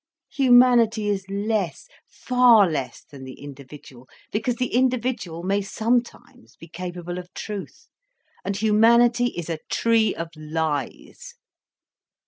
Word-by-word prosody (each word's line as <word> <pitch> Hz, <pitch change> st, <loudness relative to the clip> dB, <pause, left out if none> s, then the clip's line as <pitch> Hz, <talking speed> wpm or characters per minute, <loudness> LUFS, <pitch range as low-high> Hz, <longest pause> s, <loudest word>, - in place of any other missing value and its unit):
Humanity 245 Hz, -5 st, +4 dB
is 195 Hz, -1 st, -3 dB
less, 200 Hz, -, -2 dB, 0.2 s
far 245 Hz, -5 st, +4 dB
less 140 Hz, -6 st, -4 dB
than 140 Hz, -2 st, -13 dB
the 130 Hz, 0 st, -10 dB
individual, 140 Hz, -2 st, -13 dB, 0.2 s
because 230 Hz, +3 st, -1 dB
the 250 Hz, 0 st, -3 dB
individual 245 Hz, -9 st, -1 dB
may 200 Hz, +2 st, 0 dB
sometimes 220 Hz, -, -3 dB
be 165 Hz, -, -14 dB
capable 175 Hz, +1 st, -6 dB
of 180 Hz, 0 st, -11 dB
truth, 210 Hz, -2 st, -8 dB, 0.6 s
and 195 Hz, 0 st, -3 dB
humanity 235 Hz, +3 st, +4 dB
is 175 Hz, -, -5 dB
a 165 Hz, -2 st, -4 dB
tree 230 Hz, -1 st, +2 dB
of 165 Hz, 0 st, -5 dB
lies. 155 Hz, -, -5 dB
205 Hz, 115 wpm, -23 LUFS, 165-235 Hz, 0.6 s, Humanity